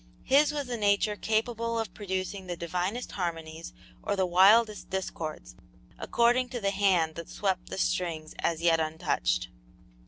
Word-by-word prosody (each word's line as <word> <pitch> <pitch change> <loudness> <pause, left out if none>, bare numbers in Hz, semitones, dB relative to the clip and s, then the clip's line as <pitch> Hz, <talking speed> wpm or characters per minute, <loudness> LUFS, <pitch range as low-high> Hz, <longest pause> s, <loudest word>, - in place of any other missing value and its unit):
His 285 +3 +4
was 290 -3 -3
a 245 -1 -3
nature 205 0 +2
capable 230 +2 -1
of 220 -5 -3
producing 190 -1 -4
the 175 -1 -4
divinest 180 +8 -3
harmonies 165 -3 -4 0.3
or 205 - -1
the 190 -1 +1
wildest 205 +5 +4
discords, 155 - -5 0.4
according 245 +2 +2
to 245 - -4
the 200 -2 0
hand 190 -5 +2
that 170 +1 -8
swept 190 -3 -2
the - - -5
strings 165 -4 -1
as 165 -1 -1
yet 165 -1 +4
untouched. 155 - -1
190 Hz, 150 wpm, -28 LUFS, 170-225 Hz, 0.4 s, His